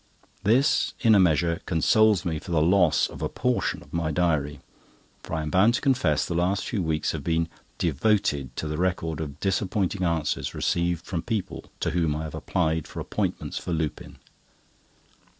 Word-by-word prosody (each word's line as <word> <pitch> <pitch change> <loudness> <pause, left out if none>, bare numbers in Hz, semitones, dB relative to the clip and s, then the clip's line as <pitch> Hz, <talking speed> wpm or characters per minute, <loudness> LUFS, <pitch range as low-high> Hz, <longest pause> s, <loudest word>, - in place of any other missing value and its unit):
This, 115 +8 +2
in 115 -3 +5
a 100 - +6
measure, 85 0 +2
consoles 100 +3 +3
me 80 -3 -1
for 90 - -13
the 85 -3 +2
loss 85 -1 +4
of - - -8
a - - -1
portion 125 -1 -1
of - - -21
my 85 -2 -1
diary; 75 -4 0 0.6
for - - -5
I 80 - -2
am 75 - -4
bound 105 +7 +4
to - - -2
confess 120 - +2
the - - -3
last 90 +3 0
few 110 -6 -2
weeks 80 -2 0
have 75 -3 -5
been 80 +2 +1 0.3
devoted 70 - 0
to 80 - -3
the 75 +1 -3
record 85 -4 -1
of 75 -1 -6
disappointing 95 0 -1
answers 85 -3 -1
received 85 -1 0
from 85 -3 -3
people 110 -1 -4 0.2
to - - 0
whom 80 -3 +1
I 75 - -3
have 80 - -6
applied 80 0 -1
for - - -8
appointments - - -3
for 90 - -4
Lupin. 80 -2 -4
85 Hz, 180 wpm, -26 LUFS, 80-95 Hz, 0.6 s, a